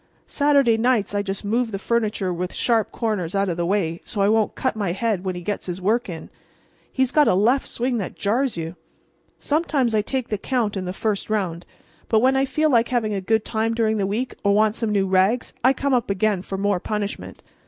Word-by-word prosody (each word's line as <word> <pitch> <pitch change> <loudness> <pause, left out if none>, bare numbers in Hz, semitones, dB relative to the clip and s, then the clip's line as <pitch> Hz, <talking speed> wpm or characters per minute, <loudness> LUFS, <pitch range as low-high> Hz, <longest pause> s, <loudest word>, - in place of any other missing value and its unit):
Saturday 280 -6 +3
nights 230 -4 +1
I 205 - +1
just 200 0 -5
move 230 +3 0
the 195 - -3
furniture 210 -3 -1
with 180 +1 -4
sharp 230 -3 +1
corners 205 -6 -2
out 195 -1 +1
of 170 - -2
the 170 -1 -1
way, 175 -4 -1
so 215 - -5
I 200 - +4
won't 220 -1 +2
cut 260 - -1
my 200 -5 -1
head 210 -2 -1
when 185 -2 -2
he 175 - -6
gets 205 +3 -4
his 180 0 -4
work 215 +4 0
in. 165 -2 -8 0.6
He's 260 -1 +1
got 300 -1 +4
a - - +4
left 235 +8 +2
swing 245 0 -1
that 195 - -5
jars 240 +3 0
you! 165 +1 -5 0.6
Sometimes 290 -6 0
I 215 - +3
take 255 +3 -3
the 210 - -2
count 230 -3 -1
in 190 -1 -3
the 180 - -3
first 205 +2 -2
round; 180 -5 -2 0.4
but 220 - +4
when 260 +3 +3
I 270 0 +3
feel 310 +3 +1
like 235 -2 +4
having 230 -4 0
a 195 - -2
good 220 +3 +1
time 225 0 -1
during 220 -1 +1
the 195 -2 0
week 230 +6 -2
or 200 -1 +3
want 215 0 +3
some 225 -2 -2
new 200 -2 +2
rags 190 +5 +1
I 260 - +6
come 275 0 -1
up 240 -4 +1
again 200 -1 +1
for 195 0 -5
more 200 -1 +1
punishment. 210 +1 -4
215 Hz, 230 wpm, -22 LUFS, 195-240 Hz, 0.6 s, I